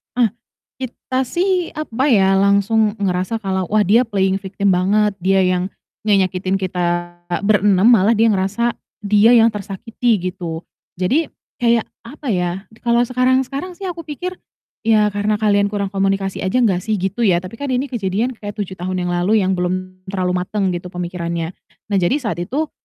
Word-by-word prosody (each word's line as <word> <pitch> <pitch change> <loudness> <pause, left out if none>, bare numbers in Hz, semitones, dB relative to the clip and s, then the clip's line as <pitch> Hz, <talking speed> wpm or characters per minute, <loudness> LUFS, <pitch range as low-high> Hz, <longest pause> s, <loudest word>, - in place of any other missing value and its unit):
Ah. 235 -5 +3 0.5
Kita 260 0 -3
sih 360 0 0
apa 275 -3 -2
ya, 195 -6 +4
langsung 200 +2 +3
ngerasa 185 +4 -1
kalau, 190 -1 -1
wah, 215 +2 +2
dia 225 +6 +4
playing 195 -2 +1
victim 195 0 -1
banget, 200 +4 +3
dia 190 +1 +2
yang 180 0 +1 0.4
ngenyakitin 190 -2 +1
kita 175 -2 -2 0.2
ber-6, 205 +1 +4
malah 225 0 +5
dia 225 +1 +4
ngerasa 205 +4 0 0.2
dia 210 +4 +5
yang 230 0 +6
tersakiti, 210 0 -2
gitu. 170 -2 -6 0.3
Jadi 250 - +1 0.3
kayak, 235 -2 +3 0.2
apa 280 +1 -6
ya, 180 -1 -1 0.2
kalau 235 0 +2
sekarang-sekarang 260 +7 0
sih 380 0 -5
aku 335 -2 -8
pikir, 360 +5 -5 0.5
"Ya, 215 -2 +4
karena 205 +1 0
kalian 205 -1 +2
kurang 200 -1 -2
komunikasi 195 -1 -1
aja 250 +6 +2
nggak 195 -6 +3
sih," 215 +4 -2
gitu 200 +4 -1
ya, 175 -2 +3
tapi 185 +5 -9
kan 275 -3 -2
ini 265 +2 -1
kejadian 215 +1 -1
kayak 205 -1 -6
7 195 -3 -5
tahun 180 +1 -2
yang 175 - -2
lalu 190 +5 +2
yang 190 -1 0
belum 185 +1 -3
terlalu 185 -1 -1
mateng 200 -3 0
gitu 175 0 -4
pemikirannya. 170 -1 -4 0.3
Nah, 200 - +2
jadi 255 +12 +1
saat 210 -8 -3
itu 285 - -2
200 Hz, 165 wpm, -19 LUFS, 185-235 Hz, 0.5 s, yang